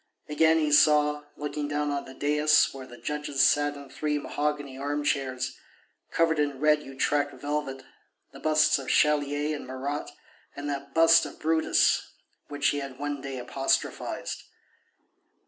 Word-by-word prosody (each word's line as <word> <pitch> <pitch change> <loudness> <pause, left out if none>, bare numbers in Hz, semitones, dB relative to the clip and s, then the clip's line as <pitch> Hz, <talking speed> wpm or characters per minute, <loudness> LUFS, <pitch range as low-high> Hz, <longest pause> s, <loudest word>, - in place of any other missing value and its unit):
Again 160 +2 +3
he 155 -2 +1
saw, 150 0 +4
looking 150 0 -4
down 145 0 -1
on 140 0 -3
the 130 - -12
daïs 150 +2 +3
where 135 -1 -9
the 120 - -12
judges 150 -1 -1
sat 145 0 +3
in 140 -1 -10
three 150 +3 -2
mahogany 145 -1 -3
armchairs, 140 -2 -2 0.5
covered 165 -2 +1
in 145 -2 -1
red 150 0 +3
Utrecht 145 +1 -1
velvet, 145 -2 -4 0.5
the - - -12
busts 155 -2 +3
of 135 - -8
Chalier 150 0 +2
and 145 - -8
Marat 135 +3 -4 0.5
and 145 +1 -6
that 140 -1 -5
bust 165 0 +6
of - - -13
Brutus 160 0 +2 0.5
which 145 -1 0
he 145 - -1
had 135 -2 -7
one 145 0 -4
day 135 -1 -6
apostrophized. 130 +2 -2
145 Hz, 145 wpm, -27 LUFS, 140-150 Hz, 0.5 s, bust